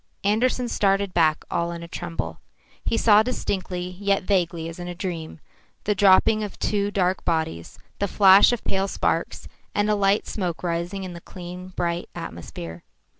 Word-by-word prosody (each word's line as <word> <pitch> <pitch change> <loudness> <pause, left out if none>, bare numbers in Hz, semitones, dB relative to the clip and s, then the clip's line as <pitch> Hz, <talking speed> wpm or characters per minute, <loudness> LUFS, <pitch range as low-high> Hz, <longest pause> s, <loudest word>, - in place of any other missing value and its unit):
Andersen 240 +5 +1
started 195 -3 +1
back 160 -2 +3
all 170 0 0
in 170 0 -6
a - - -8
tremble. 175 0 -5 0.4
He 230 - 0
saw 215 -2 +6
distinctly, 185 -6 -3
yet 200 -1 +1
vaguely 175 -4 0
as 165 +1 -8
in 175 - -5
a 175 - -5
dream, 170 -3 -5 0.4
the 210 - +1
dropping 205 +2 +5
of 205 - -6
two 205 -1 0
dark 185 -2 0
bodies, 160 - -2 0.2
the 200 - +1
flash 195 +2 +7
of 240 - -2
pale 195 0 0
sparks, - - -1 0.3
and 205 +1 +2
a - - +3
light 200 0 +2
smoke 180 -5 -3
rising 175 +3 -2
in 185 -1 -6
the 170 - -9
clean, 180 0 -9
bright 170 0 -2
atmosphere. 85 0 -7
185 Hz, 170 wpm, -24 LUFS, 170-205 Hz, 0.4 s, flash